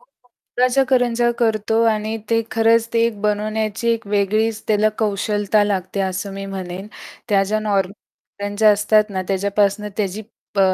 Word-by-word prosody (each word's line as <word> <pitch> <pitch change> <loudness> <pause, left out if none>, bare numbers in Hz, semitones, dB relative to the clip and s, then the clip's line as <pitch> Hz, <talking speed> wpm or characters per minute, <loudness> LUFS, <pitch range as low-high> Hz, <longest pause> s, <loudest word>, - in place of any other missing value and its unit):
गुळाच्या 255 - -2
करंजा 240 -2 +2
करतो 220 -1 +1
आणि 215 0 -1
ते 230 0 +3
खरंच 230 -1 +3
ते 230 0 +3
बनवण्याची 215 +2 -1
एक 230 -2 -2
वेगळीच 215 +2 0
त्याला 215 0 +3
कौशलता 210 0 +1
लागते 195 -1 -2
असं 190 +1 -3
मी 195 0 -6
म्हणेन. 190 0 -6 0.4
त्या 200 -2 +3
ज्या 215 +2 0
नॉर्मल 200 -3 0 0.5
करंज्या 205 +1 +3
असतात 210 +1 +2
ना 190 -1 -2
त्याच्यापासनं 200 +1 0
त्याची 210 0 -2 0.3
प 200 - +2
210 Hz, 140 wpm, -20 LUFS, 200-225 Hz, 0.5 s, ते